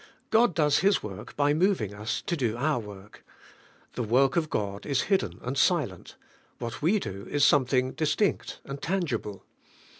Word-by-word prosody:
God 225 -4 +4
does 150 -3 +3
His 200 +2 +2
work 100 -3 -8
by 145 0 +2
moving 165 - +1
us 110 +2 -3
to 170 - -1
do 120 -7 -1
our 145 +1 +1
work. 105 -2 -11 0.7
The - - -3
work 125 +4 +3
of 160 -2 +1
God 100 -1 -3
is 140 -2 0
hidden 95 - 0
and 125 +3 -3
silent; 135 - 0 0.4
what 115 -2 -6
we 175 +8 +3
do 100 - -6
is 145 -1 +3
something 130 -1 +3
distinct 160 +6 -1
and 140 0 -7
tangible. 135 - -2
135 Hz, 160 wpm, -27 LUFS, 105-155 Hz, 0.7 s, God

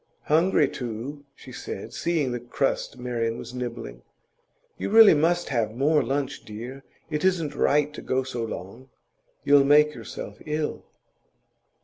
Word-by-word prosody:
'Hungry, 160 -1 +3
too,' 125 +5 -6
she 130 - -13
said, 115 -2 -7
seeing 155 -5 0
the 120 - -3
crust 125 +2 -2
Marian 120 -2 -2
was - - -8
nibbling. 120 - -6 0.8
'You - - -2
really 220 -2 +8
must 170 +3 +1
have 115 -4 -1
more 150 +4 +3
lunch, 140 0 -2
dear. 120 +6 -8 0.3
It 150 +1 -1
isn't 170 -6 +1
right 150 +1 +2
to - - -8
go 130 +1 0
so 125 -3 -4
long; 115 +4 -7 0.5
you'll 140 0 +6
make 150 +2 +5
yourself - - -8
ill. 150 0 -2
135 Hz, 140 wpm, -25 LUFS, 120-150 Hz, 0.8 s, really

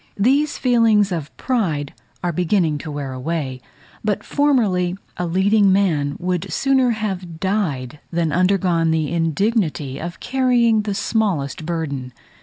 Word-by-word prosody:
These 275 +8 +2
feelings 225 -5 +3
of 160 -4 -3
pride 170 - -1 0.3
are 175 -1 0
beginning 170 -3 +1
to 155 - -7
wear 140 -2 -4
away; 130 -1 -3 0.4
but 210 -2 -1
formerly 205 -11 +1 0.2
a 180 - -2
leading 195 +3 +3
man 160 -8 +1
would 180 -1 -2
sooner 265 -2 +2
have 190 -7 -3
died, 155 - -2
than 165 -2 0
undergone 180 -2 +2
the 160 -1 0
indignity 165 - 0
of 170 +1 -6
carrying 245 -4 +2
the 205 -1 -3
smallest 170 - -1
burden. 140 -7 -3
180 Hz, 130 wpm, -20 LUFS, 155-215 Hz, 0.4 s, feelings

